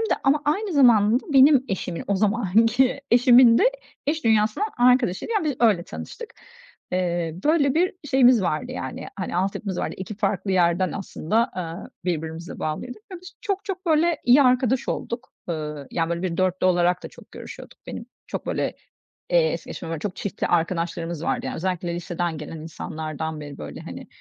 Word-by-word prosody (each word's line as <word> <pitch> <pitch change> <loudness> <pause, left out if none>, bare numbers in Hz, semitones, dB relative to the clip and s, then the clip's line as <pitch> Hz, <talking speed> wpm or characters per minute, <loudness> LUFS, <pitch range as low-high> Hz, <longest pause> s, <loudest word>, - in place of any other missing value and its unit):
de 450 - +1
ama 285 +2 +3
aynı 390 +7 0
zamanda 240 -4 +5
benim 270 0 +6
eşimin, 180 -3 -4
o 200 - +1
zamanki 225 +5 +2
eşimin 240 -1 +7
de - - +4 0.4
iş 310 0 -1
dünyasından 220 - +2
arkadaşıydı, 250 - +3
yani, 415 -7 +1
biz 290 -4 -1
öyle 210 -7 +4
tanıştık. 470 - -9 0.6
Eee, 175 -3 -1
böyle 290 -3 +3
bir 360 +4 +2 0.2
şeyimiz 250 -5 +5
vardı, 155 -3 -2
yani, 130 - -6
hani, 185 -3 -3
altyapımız 190 0 -2
vardı, - - -3
2 190 +3 -6
farklı 195 -1 -1
yerden 180 0 +2
aslında, 215 +4 -1
eee, 170 +1 -5 0.2
birbirimize 160 -1 -4
bağlıydık 215 +9 -4
ve - - -5
biz 365 - -12
çok 395 -1 -2
çok 380 -2 -5
böyle 320 0 +3
iyi 255 +4 +6
arkadaş 255 0 +2
olduk, 235 +1 -4 0.2
eee, 150 -4 -4
yani, 165 -1 -1
böyle 170 +1 -2
bir 175 -2 -2
4'lü 185 0 +1
olarak 175 0 +2
da - - -6
çok - - -17
görüşüyorduk - - -10
benim. - - -7 0.2
Çok - - -6
böyle - - -2 0.5
es - - +2
geçemem, 165 - -7
böyle 165 - -3
çok 185 +2 -4
çiftli 200 0 -3
arkadaşlarımız 170 -1 -1
vardı, - - -1
yani, - - -3
özellikle 175 -1 -2
liseden 175 -1 -3
gelen 155 +2 -7
insanlardan 155 0 -5
beri 145 -1 -9
böyle, 75 -1 -8
hani, - - -9
195 Hz, 170 wpm, -24 LUFS, 170-260 Hz, 0.6 s, eşimin